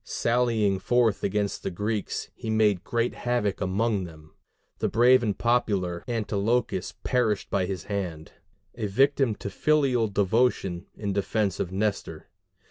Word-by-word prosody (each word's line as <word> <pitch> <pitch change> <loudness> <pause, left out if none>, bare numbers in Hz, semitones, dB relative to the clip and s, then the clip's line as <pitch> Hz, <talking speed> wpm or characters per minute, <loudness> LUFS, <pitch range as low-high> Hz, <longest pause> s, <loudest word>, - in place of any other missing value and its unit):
Sallying 115 -5 +1
forth 115 +1 +2
against 100 0 -1
the - - -3
Greeks, 105 +3 -3
he 110 - -7
made 105 -4 +2
great 115 +2 -1
havoc 120 -6 -1
among 100 +1 0
them: 80 -2 -14 0.5
the - - 0
brave 125 +3 +5
and 105 -4 -1
popular 100 -8 0
Antilochus 110 -3 -1
perished 115 -6 0
by 95 -2 +1
his 95 -4 -4
hand, 90 -6 -4 0.4
a 110 -3 -3
victim 135 +2 +2
to - - -7
filial 135 -3 +2
devotion 100 -3 0
in 100 -2 -3
defence 100 -1 -1
of 90 - -2
Nestor. 100 +1 -3
105 Hz, 135 wpm, -26 LUFS, 95-120 Hz, 0.5 s, brave